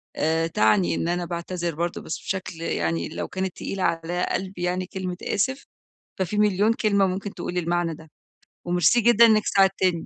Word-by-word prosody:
آآ 160 +1 +1
تعني 105 - +2
إن 165 - -2
أنا 175 0 -1
باعتذر 170 0 -4
برضه 170 +2 -3
بس - - -5
بشكل 180 -3 -5
يعني 85 - -1
لو - - -4
كانت 190 -1 -4
تقيلة 195 -1 -4
على 170 +1 0
قلبي 185 -1 -3
يعني 180 +1 -1
كلمة 185 -1 -5
آسف، 265 +7 -1 0.5
ففي 190 +3 -1
مليون 210 +1 +3
كلمة 200 -4 +2
ممكن 195 +2 -4
تقول 180 0 -4
المعنى 170 -1 0
ده. 160 0 -15 0.6
وميرسي 175 +6 +3
جدًا 235 0 +6
إنّك 215 -2 +4
ساعدتّني. 195 -1 +3
180 Hz, 165 wpm, -24 LUFS, 165-195 Hz, 0.6 s, جدًا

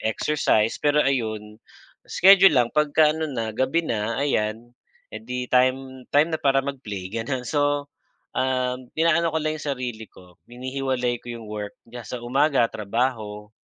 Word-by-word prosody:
exercise. 110 -1 +1
Pero 145 0 +2
ayun, 110 -5 -2 0.5
schedule 195 -2 +7
lang, 120 -1 +2
pagka, 150 0 +3
ano 160 0 -3
na, 115 -5 -3
gabi 130 +9 0
na 115 -3 -2
ayan, 115 -3 -1 0.4
eh - - -6
di 125 - -4
time 130 0 +1
time 150 +3 +4
na 160 - -2
para 135 -1 +3
mag-play, 105 -10 -6
ganun, 125 +3 -3
So, 145 +1 0 0.4
um, 130 -1 -1
inaano 165 +1 +3
ko - - +2
lang 155 0 -2
yung 145 - -5
sarili 125 -5 -4
ko, 90 -1 -19
hinihiwalay 125 -1 -2
ko - - -13
yung 115 - -10
work 105 -1 -6
kaya 120 -1 -10
sa 125 -1 -6
umaga 135 +1 +2
trabaho, 105 -1 -3
130 Hz, 155 wpm, -24 LUFS, 115-145 Hz, 0.5 s, schedule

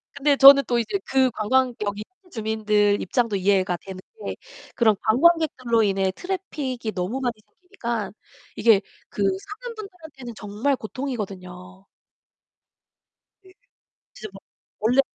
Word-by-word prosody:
근데 285 0 +2
저는 275 0 +9
또 240 -1 +1
이제 235 - -2
그 265 -1 +3
관광 250 +4 +1
여기 205 0 -3 0.2
현지 360 - -19
주민들 210 -2 +1
입장도 230 +2 0
이해가 190 -2 +1
되는 190 +1 -10 0.3
게 - - -4 0.4
그런 220 -3 +4
관광객들로 255 -2 +3
인해 195 -2 +1
트래픽이 290 - -4
너무 190 +8 -3
많이 245 -2 -1
생기니까 235 - -5 0.4
이게 215 -2 +4 0.3
그 - - -6
사는 420 - -8
분들한테는 315 - -10
정말 215 +7 -1
고통이거든요. 195 -7 -7 1.6
네 375 0 -19 0.6
진짜 215 - -8
뭐 195 - -11 0.4
원래 240 +6 +4
230 Hz, 280 characters per minute, -23 LUFS, 205-275 Hz, 1.6 s, 저는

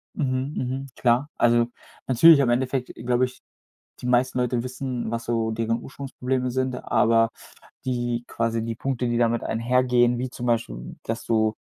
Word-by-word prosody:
Mhm, 130 -1 -1
mhm 130 +2 -3
klar. 125 +4 +2
Also, 120 0 +4 0.4
natürlich 150 +5 +7
im 130 -3 +3
Endeffekt 130 +1 0
glaube 120 +2 +1
ich 125 0 -13 0.6
die - - -5
meisten 125 +1 +2
Leute 125 -1 0
wissen, 130 -2 -4
was 115 0 -3
so 115 -1 0
deren 115 +1 -1
Ursprungsprobleme 130 -2 -3
sind, 130 +1 -1
aber 115 0 +3 0.6
die 120 -2 -1
quasi 115 -1 -1
die 115 0 -3
Punkte, 125 +1 -2
die 120 0 0
damit 120 0 +2
einhergehen, 120 +1 +2
wie 125 +1 -3
zum 125 0 -6
Beispiel, 65 - -2
dass 115 0 -4
du, 110 -1 +2
120 Hz, 160 wpm, -24 LUFS, 115-130 Hz, 0.6 s, natürlich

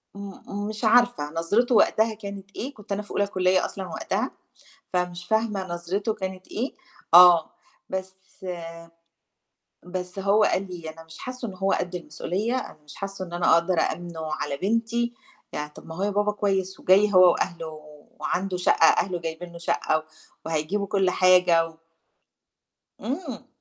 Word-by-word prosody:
م 200 +1 -6
مش 215 +2 -6
عارفة 240 -9 +4
نظرته 210 +9 +2
وقتها 220 +1 +4
كانت 200 -2 -8
إيه، 275 +4 -4
كنت 210 -1 -14
أنا 200 +1 0
في 205 - -12
أولى 200 0 +1
كلّية 185 -1 +2
أصلًا 190 -2 -6
وقتها، - - -2 0.6
فمش 180 0 -1
فاهمة 210 -3 0
نظرته 180 +5 -2
كانت 190 -3 -6
إيه، 250 +5 -3 0.4
آه، 175 -2 +8 0.4
بس 190 0 -4 1.7
بس 180 +1 -5
هو 200 +2 +3
قال 195 -1 +1
لي 170 -3 -7
"أنا 165 +1 -11
مش 160 0 -13
حاسّه 255 -2 -5
إن 190 - -7
هو 195 +1 0
قد 180 0 -2
المسؤولية، 195 +7 -2
أنا 255 - -6
مش 150 - -11
حاسّه 195 -1 -5
إن 175 - -11
أنا 175 -1 +3
أقدر 170 +1 +3
أأمنُه 160 -2 -2
على 140 - -3
بنتي." 230 +4 0 0.4
يعني 150 0 -3
طَب - - -14
ما 160 - -7
أهو 200 +3 -1
بابا 205 +1 +1
كويس 195 -2 -1
وجاي 200 +2 +4
هو 185 -1 +8
وأهله 170 -3 -2 0.5
وعنده 185 0 -1
شقّة 180 - +3
أهله 180 -3 +2
جايبين 165 +1 -6
له - - -9
شقّة 155 -1 +1
و 155 - -5 0.4
وهيجيبوا 165 +6 -1
كلّ 190 -2 +2
حاجة 180 -2 +5
و 160 -1 -16 1.2
إمم. 275 - -5
190 Hz, 160 wpm, -25 LUFS, 175-210 Hz, 1.7 s, آه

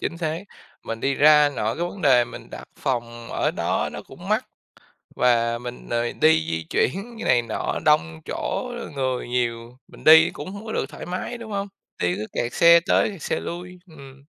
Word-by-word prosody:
Chính 170 - -3
xác. 165 +2 -3 0.4
Mình 115 0 -5
đi 135 +2 +1
ra, 150 0 +6
nội 110 +2 -1
cái 175 - 0
vấn 185 +1 -10
đề 125 -5 +5
mình - - -11
đặt - - -8
phòng 120 -2 -3
ở - - 0
đó - - -1
nó - - -7
cũng - - -12
mắc, - - +1 0.7
và 115 -1 +2
mình, 125 0 -8
ờ, 120 0 -1
đi 160 +1 +4
di 80 0 -2
chuyển 210 - -1
này 120 -1 +4
nọ 115 -2 -3
đông, 80 0 +2
chỗ - - -3 0.2
người 130 -2 -2
nhiều, 120 0 -2
mình - - -15
đi 160 +1 +8
cũng 150 +6 -8
hông 200 +2 -9
có 220 - -5
được - - -1
thoải - - -9
mái, 185 +7 -4
đúng 230 -2 -9
hông? 200 0 -2 0.3
Đi 90 0 +1
cứ 105 +2 -4
kẹt 120 - -2
xe 170 0 +7
tới 175 +4 +2
kẹt 195 -6 -11
xe - - -1
lui 180 +1 -7
ừm. 140 -3 -14
135 Hz, 200 wpm, -23 LUFS, 120-170 Hz, 0.7 s, đi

